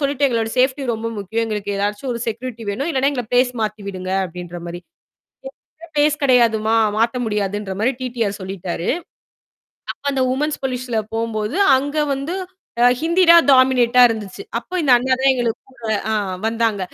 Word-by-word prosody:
சொல்லிட்டேன் 280 Hz, 0 st, +1 dB
எங்களோட 225 Hz, -2 st, -1 dB
சேஃப்டி 260 Hz, +2 st, +2 dB
ரொம்ப 225 Hz, +1 st, -5 dB
முக்கியம். 225 Hz, +4 st, -2 dB
எங்களுக்கு 210 Hz, -2 st, -3 dB
ஏதாச்சும் 210 Hz, +6 st, -2 dB
ஒரு 235 Hz, -, -4 dB
செக்யூரிட்டி 235 Hz, +1 st, -5 dB
வேணும். 275 Hz, +10 st, -3 dB
இல்லன்னா, 275 Hz, -1 st, +1 dB
எங்கள 255 Hz, -3 st, -2 dB
பிளேஸ் 245 Hz, 0 st, +4 dB
மாத்தி 215 Hz, 0 st, -3 dB
விடுங்க 185 Hz, -1 st, -5 dB
அப்பிடின்றமாரி 175 Hz, 0 st, -7 dB, 1.2 s
பிளேஸ் 300 Hz, +1 st, +2 dB
கிடையாதும்மா! 230 Hz, -4 st, +3 dB, 0.2 s
மாற்ற 230 Hz, +3 st, +1 dB
முடியாதுன்ற 205 Hz, -2 st, -2 dB
மாதிரி 235 Hz, +5 st, +2 dB
டி-டி-ஆர் 235 Hz, -5 st, -2 dB
சொல்லிட்டாரு. 185 Hz, -2 st, -5 dB, 1.1 s
அப்ப -, -, -33 dB
அந்த 270 Hz, -, -1 dB
வுமன்ஸ் 295 Hz, +4 st, -1 dB
போலீஸ்ல 250 Hz, -3 st, -2 dB
போம்போது, 225 Hz, -, -2 dB, 0.2 s
அங்க 285 Hz, +3 st, -3 dB, 0.2 s
வந்து 275 Hz, +6 st, -3 dB, 0.7 s
ஹிந்தி 340 Hz, +4 st, +3 dB
தான் 335 Hz, 0 st, +7 dB
டாமினேட்டா 250 Hz, -1 st, +5 dB
இருந்துச்சு. 215 Hz, -4 st, -5 dB, 0.2 s
அப்ப 240 Hz, -, -13 dB
இந்த 275 Hz, -4 st, +4 dB
அண்ணா 260 Hz, +2 st, +1 dB
தான் 270 Hz, -, +4 dB
எங்களுக்கு 240 Hz, -3 st, -1 dB
கூட 260 Hz, -, -21 dB, 0.6 s
வந்தாங்க. 225 Hz, -2 st, 0 dB
235 Hz, 145 wpm, -20 LUFS, 210-265 Hz, 1.2 s, தான்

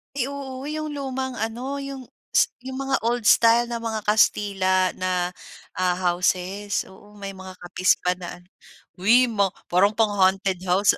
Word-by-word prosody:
Ay, 265 Hz, -2 st, 0 dB
oo 275 Hz, -1 st, -6 dB
iyong 310 Hz, 0 st, -4 dB
lumang 265 Hz, -3 st, -4 dB
ano 245 Hz, +5 st, -3 dB
iyong 275 Hz, -1 st, -6 dB, 0.3 s
is -, -, +4 dB
iyong 260 Hz, +1 st, -7 dB
mga 270 Hz, 0 st, +1 dB
old 240 Hz, 0 st, 0 dB
style 230 Hz, +2 st, +5 dB
na 235 Hz, -, -2 dB
mga 220 Hz, -2 st, -3 dB
Kastila 195 Hz, -3 st, +2 dB
na, 185 Hz, 0 st, -1 dB, 0.6 s
ah, 180 Hz, -1 st, 0 dB
houses. 185 Hz, +3 st, 0 dB
Oo 205 Hz, +2 st, -17 dB
may 200 Hz, -1 st, -6 dB
mga 190 Hz, -1 st, -10 dB
kapis 180 Hz, +1 st, +1 dB
pa 180 Hz, -, +2 dB
na 175 Hz, -, -7 dB
ano. 175 Hz, -, -24 dB, 0.5 s
Uy 230 Hz, +7 st, +5 dB
ma 200 Hz, -2 st, +2 dB, 0.2 s
parang 200 Hz, +4 st, +3 dB
pang-haunted 195 Hz, -3 st, +2 dB
house. 190 Hz, +3 st, +4 dB
210 Hz, 160 wpm, -24 LUFS, 185-255 Hz, 0.6 s, style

